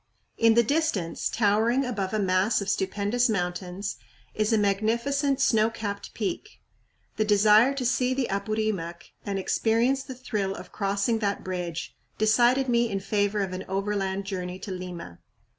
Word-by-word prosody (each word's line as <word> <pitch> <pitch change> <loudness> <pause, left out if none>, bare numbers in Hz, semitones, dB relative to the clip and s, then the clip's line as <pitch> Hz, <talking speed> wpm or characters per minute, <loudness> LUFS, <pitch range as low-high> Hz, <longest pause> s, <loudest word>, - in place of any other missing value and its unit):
In 230 -1 +4
the 235 - +6
distance, 235 - 0
towering 225 +5 +2
above 200 -6 -2
a 215 - 0
mass 190 +2 +2
of 200 -1 -3
stupendous 205 +5 0
mountains, 180 - -3 0.4
is 215 +1 0
a 225 - +4
magnificent 235 +8 +1
snow 225 -4 +3
capped 205 -3 -6
peak. 235 - -4 0.6
The 215 - +3
desire 215 +5 +5
to 260 -2 -3
see 250 +1 +1
the 265 -2 0
Apurimac 200 -4 -3 0.2
and 200 -1 -1
experience 230 +7 +1
the 265 -1 -8
thrill 210 -6 -2
of - - -10
crossing 200 +3 0
that 200 -2 -1
bridge 175 -3 -4 0.2
decided 240 +5 +3
me 235 -1 +2
in 195 -2 -2
favor 205 +1 0
of 190 -2 -2
an 185 +1 -4
overland 195 0 -1
journey 180 -2 -4
to 190 +1 -7
Lima. 180 - -7
210 Hz, 155 wpm, -26 LUFS, 195-235 Hz, 0.6 s, the